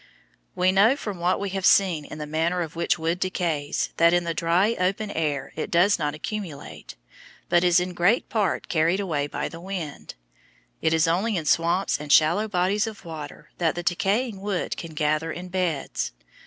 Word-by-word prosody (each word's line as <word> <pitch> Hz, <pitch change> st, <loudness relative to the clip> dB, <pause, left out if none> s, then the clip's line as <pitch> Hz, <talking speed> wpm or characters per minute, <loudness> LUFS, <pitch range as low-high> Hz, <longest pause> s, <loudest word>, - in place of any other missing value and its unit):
We 185 Hz, +1 st, +3 dB
know 205 Hz, +7 st, +5 dB
from 205 Hz, -10 st, -6 dB
what 180 Hz, +2 st, +1 dB
we 200 Hz, -1 st, -3 dB
have 195 Hz, 0 st, -3 dB
seen 180 Hz, -6 st, +3 dB
of -, -, -6 dB
the 150 Hz, -, -5 dB
manner 165 Hz, +4 st, 0 dB
in 160 Hz, -, -6 dB
which 170 Hz, +2 st, 0 dB
wood 165 Hz, +2 st, -1 dB
decays, 170 Hz, -6 st, -1 dB
that 170 Hz, 0 st, +5 dB
in 175 Hz, -, +2 dB
the 170 Hz, -1 st, -2 dB
dry, 175 Hz, +7 st, +2 dB
open 195 Hz, +3 st, 0 dB
air 150 Hz, -5 st, -2 dB
it 155 Hz, -, -4 dB
does 180 Hz, +4 st, +3 dB
not 150 Hz, -1 st, -1 dB
accumulate, 180 Hz, -2 st, -7 dB, 0.5 s
but 175 Hz, 0 st, +4 dB
is 175 Hz, -1 st, +5 dB
in 180 Hz, 0 st, -3 dB
great 180 Hz, +8 st, +2 dB
part 205 Hz, -6 st, -1 dB
carried 165 Hz, +3 st, +2 dB
away 155 Hz, -8 st, -1 dB
by -, -, -3 dB
the 165 Hz, -, -10 dB
wind. 175 Hz, -, -6 dB, 0.7 s
It 160 Hz, -, +2 dB
is 160 Hz, +1 st, +3 dB
only 190 Hz, +6 st, +1 dB
in 160 Hz, -, -3 dB
swamps 170 Hz, +4 st, +1 dB
and 150 Hz, -1 st, -5 dB
shallow 170 Hz, +10 st, +4 dB
bodies 200 Hz, +3 st, +1 dB
of 215 Hz, -4 st, -9 dB
water 155 Hz, -1 st, -9 dB
that 165 Hz, -2 st, +1 dB
the 175 Hz, -, -4 dB
decaying 195 Hz, +5 st, 0 dB
wood 200 Hz, -3 st, -2 dB
can 165 Hz, -2 st, -8 dB
gather 155 Hz, +2 st, 0 dB
in 180 Hz, +3 st, -7 dB
beds. 175 Hz, -6 st, -2 dB
175 Hz, 190 wpm, -25 LUFS, 160-195 Hz, 0.7 s, know